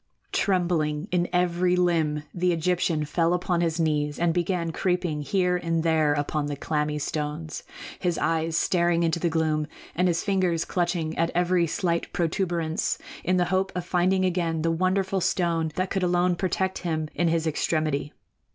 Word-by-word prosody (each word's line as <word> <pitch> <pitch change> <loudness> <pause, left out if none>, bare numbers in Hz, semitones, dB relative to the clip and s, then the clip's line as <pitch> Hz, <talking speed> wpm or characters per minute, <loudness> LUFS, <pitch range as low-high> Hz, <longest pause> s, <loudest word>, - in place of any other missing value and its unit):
Trembling 170 -4 0
in 175 -1 +1
every 180 0 +2
limb, 165 -4 +1
the 180 0 +1
Egyptian 165 -2 0
fell 165 +3 +1
upon 180 -1 0
his 165 -1 0
knees 150 -2 0
and 170 -1 +2
began 175 -1 -1
creeping 180 -4 -1
here 180 +5 +1
and 165 -2 -1
there 160 -2 +3
upon 145 0 -1
the 145 - -3
clammy 150 +1 -1
stones, 150 +1 -4 0.4
his 175 -3 0
eyes 165 0 0
staring 170 -1 +2
into 165 0 +1
the 170 - +1
gloom 155 -2 0 0.3
and 180 +2 +2
his 175 -1 0
fingers 185 -5 +1
clutching 170 -3 -1
at 165 0 +2
every 175 -1 +2
slight 170 +1 -1
protuberance 170 -2 -1 0.3
in 185 +1 +2
the 180 - +3
hope 190 +1 +1
of 180 -1 -3
finding 185 +1 +2
again 170 -3 0
the 165 - +2
wonderful 185 +3 +1
stone 165 -3 0
that 185 0 -1
could 195 - 0
alone 180 0 +2
protect 190 +1 -1
him 160 -3 -2
in 175 - +1
his 165 0 +1
extremity. 155 -2 0
170 Hz, 165 wpm, -26 LUFS, 160-180 Hz, 0.4 s, there